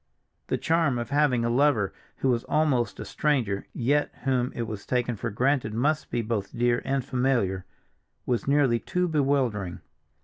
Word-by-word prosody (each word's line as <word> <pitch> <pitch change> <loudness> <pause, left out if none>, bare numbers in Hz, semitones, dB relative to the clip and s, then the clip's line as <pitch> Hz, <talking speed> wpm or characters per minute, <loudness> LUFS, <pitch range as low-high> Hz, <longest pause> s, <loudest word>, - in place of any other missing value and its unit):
The - - 0
charm 160 -6 +1
of 120 +3 -4
having 140 -5 +2
a - - +1
lover 125 -6 +2 0.2
who 135 - 0
was 120 -2 +1
almost 130 -8 +1
a - - -5
stranger, 125 -10 0
yet 145 +4 +1
whom 130 -2 +1
it 120 - -2
was 110 -3 -6
taken 125 -1 0
for 115 +3 -3
granted 125 0 0
must 150 +6 0
be 120 - -1
both 110 0 -3
dear 120 0 +2
and 135 -2 -1
familiar, 125 -9 0 0.6
was 125 0 -1
nearly 140 -4 +3
too 180 - -1
bewildering. 135 - 0
125 Hz, 165 wpm, -26 LUFS, 115-140 Hz, 0.6 s, nearly